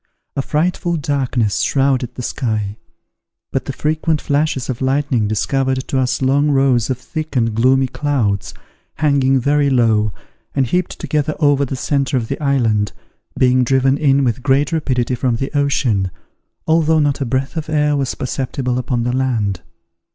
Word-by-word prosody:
A 140 - 0
frightful 170 +4 0
darkness 130 -7 0
shrouded 135 -3 +1
the 125 - -5
sky; 110 -4 -2 0.7
but - - -2
the - - -3
frequent 155 +1 0
flashes 145 -3 0
of 130 -1 -4
lightning 130 -4 +1
discovered 130 +4 -1
to 135 - +1
us 130 0 0
long 140 +3 +3
rows 135 -4 +2
of 130 - -1
thick 155 +4 -6
and 115 -3 +1
gloomy 130 +4 +3
clouds, 125 - -1 0.4
hanging 140 -3 +2
very 145 +2 +2
low, 110 -5 +2 0.4
and 135 -2 +2
heaped 180 +9 -1
together 150 0 -1
over 145 -2 +3
the 135 - -4
centre 140 0 0
of 115 -3 -3
the - - -4
island, 115 -7 +1 0.4
being 130 0 +4
driven 130 +2 +2
in 140 -2 +2
with 125 0 0
great 140 +3 +2
rapidity 130 -6 0
from 125 -1 0
the 135 +5 -4
ocean, 125 -9 +1 0.6
although 160 0 +3
not 145 -2 +1
a - - +2
breath 130 +5 -2
of 160 -1 -4
air 150 -1 +2
was 135 -2 -1
perceptible 130 -1 -2
upon 125 -2 -1
the 125 +1 -1
land. 110 -9 -1
135 Hz, 160 wpm, -18 LUFS, 125-145 Hz, 0.7 s, being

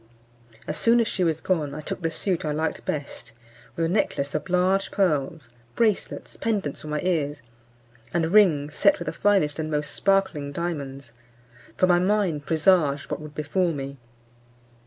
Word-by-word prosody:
As 150 - -3
soon 235 +1 +4
as 230 - +2
she 185 - 0
was 160 -2 0
gone, 150 -6 -1
I 155 - -5
took 170 - -5
the 165 - 0
suit 180 +1 -2
I 155 - -1
liked 160 +2 -2
best, 140 -5 -5 0.4
with 165 - 0
a - - +1
necklace 165 -6 0
of - - -3
large 185 +2 +2
pearls, 150 - -1 0.2
bracelets, 220 -4 -1
pendents 205 -11 -2
for - - -9
my 150 0 -2
ears, 150 -5 -1 0.7
and 165 -1 0
rings 155 -8 +4
set 300 - +4
with - - -6
the - - -3
finest 190 -8 +2
and 155 0 -2
most 150 -1 -2
sparkling 190 -8 +1
diamonds; 140 -6 -5 0.6
for - - +4
my 175 -1 +4
mind 185 -6 0
presaged 155 -3 +2
what - - -3
would 150 -1 -10
befall 170 +3 0
me. 140 -1 -6
160 Hz, 170 wpm, -25 LUFS, 145-185 Hz, 0.7 s, soon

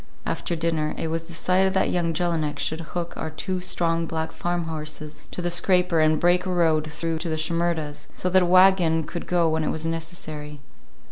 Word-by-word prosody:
After 170 - -2
dinner 160 -2 -1
it 160 - -2
was 165 0 -3
decided 185 +2 +1
that 190 - +2
young 170 -2 +1
Jelinek 160 -3 -1
should 160 +3 -2
hook 170 +1 -5
our - - -3
two 185 +4 -3
strong 170 -2 0
black 160 0 -3
farmhorses 155 -3 -4
to 180 - -5
the 175 - 0
scraper 180 -1 +3
and 155 0 +3
break 175 +1 +3
a - - -1
road 160 -3 +2
through 165 0 -2
to 170 - -3
the 160 - -1
Shimerdas', 160 -2 -2
so - - -2
that 185 +1 +5
a - - +3
wagon 180 -3 +5
could 170 +3 -6
go 175 -2 +3
when 160 0 +1
it - - 0
was 160 0 -2
necessary. 160 -3 -4
165 Hz, 195 wpm, -24 LUFS, 155-175 Hz, -, that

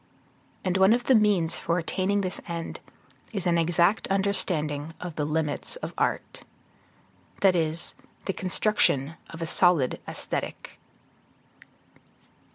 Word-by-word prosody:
And 185 0 0
one 190 +3 +6
of 245 +1 0
the 265 - +3
means 200 -7 +3
for 170 - 0
attaining 190 +4 0
this 185 -1 -2
end 170 -1 -5 0.5
is 195 -4 -2
an 170 -1 +3
exact 170 +5 +2
understanding 165 -6 0
of 180 -2 -6
the 150 - -1
limits 150 - -2
of - - -6
art, - - -2 1.0
that 190 -2 +5
is, 165 0 +2 0.3
the 195 - -1
construction 185 -7 +1 0.2
of 165 0 -6
a - - -1
solid 165 -5 +3
Aesthetic. - - -5
175 Hz, 125 wpm, -26 LUFS, 160-195 Hz, 1.0 s, one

